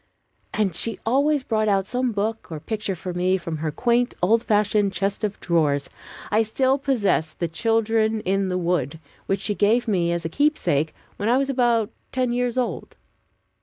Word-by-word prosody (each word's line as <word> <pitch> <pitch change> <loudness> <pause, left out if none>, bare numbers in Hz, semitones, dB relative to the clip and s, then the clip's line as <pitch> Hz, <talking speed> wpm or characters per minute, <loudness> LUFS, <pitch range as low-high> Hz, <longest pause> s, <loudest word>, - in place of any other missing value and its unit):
And 210 -5 0
she 220 +5 0
always 280 +4 +2
brought 215 -3 0
out 195 -2 +2
some 250 +3 -1
book 220 -1 -3
or 155 - -4
picture 210 +2 -3
for 180 +1 -6
me 180 +2 +1
from 165 -3 -5
her 155 +1 -2
quaint 240 +8 +1
old 220 +6 +3
fashioned 210 -2 +1
chest 200 +2 -2
of 210 -1 -2
drawers. 150 -5 +1 0.4
I 215 +2 +4
still 260 +5 +1
possess 205 - +1
the 170 - -2
"Children 225 +4 +1
in 195 0 0
the 180 0 -1
Wood," 170 -5 -1 0.3
which 195 0 0
she 210 - 0
gave 220 +4 +2
me, 175 -5 +1
as 170 -1 -2
a - - +1
keepsake, 165 - +1 0.2
when 210 +2 -1
I 245 - +4
was 275 0 0
about 240 -4 +2 0.2
ten 255 -2 0
years 245 0 -1
old. 250 - -3
210 Hz, 180 wpm, -23 LUFS, 180-240 Hz, 0.4 s, I